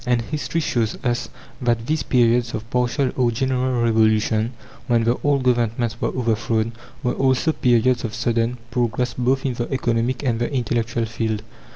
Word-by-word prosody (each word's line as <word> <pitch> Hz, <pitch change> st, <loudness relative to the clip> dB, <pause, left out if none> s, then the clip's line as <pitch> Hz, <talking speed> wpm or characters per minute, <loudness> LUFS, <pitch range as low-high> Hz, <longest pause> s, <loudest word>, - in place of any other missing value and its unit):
And 120 Hz, -1 st, +3 dB
history 155 Hz, +5 st, -2 dB
shows 115 Hz, -7 st, 0 dB
us 120 Hz, -2 st, -1 dB, 0.3 s
that 120 Hz, -2 st, +1 dB
these 155 Hz, +2 st, 0 dB
periods 120 Hz, -1 st, +2 dB
of 110 Hz, +1 st, -6 dB
partial 125 Hz, +2 st, +1 dB
or 125 Hz, -2 st, +2 dB
general 130 Hz, 0 st, 0 dB
revolution, 110 Hz, 0 st, +2 dB, 0.3 s
when 120 Hz, -3 st, +3 dB
the 120 Hz, +2 st, +2 dB
old 140 Hz, -2 st, +2 dB
governments 120 Hz, -2 st, 0 dB
were -, -, +1 dB
overthrown, 115 Hz, -2 st, 0 dB, 0.3 s
were 125 Hz, -, +1 dB
also 135 Hz, +4 st, +2 dB
periods 125 Hz, -1 st, +2 dB
of 115 Hz, -1 st, -4 dB
sudden, 115 Hz, +1 st, 0 dB
progress 120 Hz, 0 st, 0 dB
both 130 Hz, +2 st, 0 dB
in 130 Hz, -, 0 dB
the 120 Hz, +2 st, -4 dB
economic 120 Hz, 0 st, 0 dB
and 120 Hz, -4 st, 0 dB
the 120 Hz, -, -1 dB
intellectual 115 Hz, -2 st, -1 dB
field. 110 Hz, -1 st, -2 dB
120 Hz, 165 wpm, -22 LUFS, 115-125 Hz, 0.3 s, And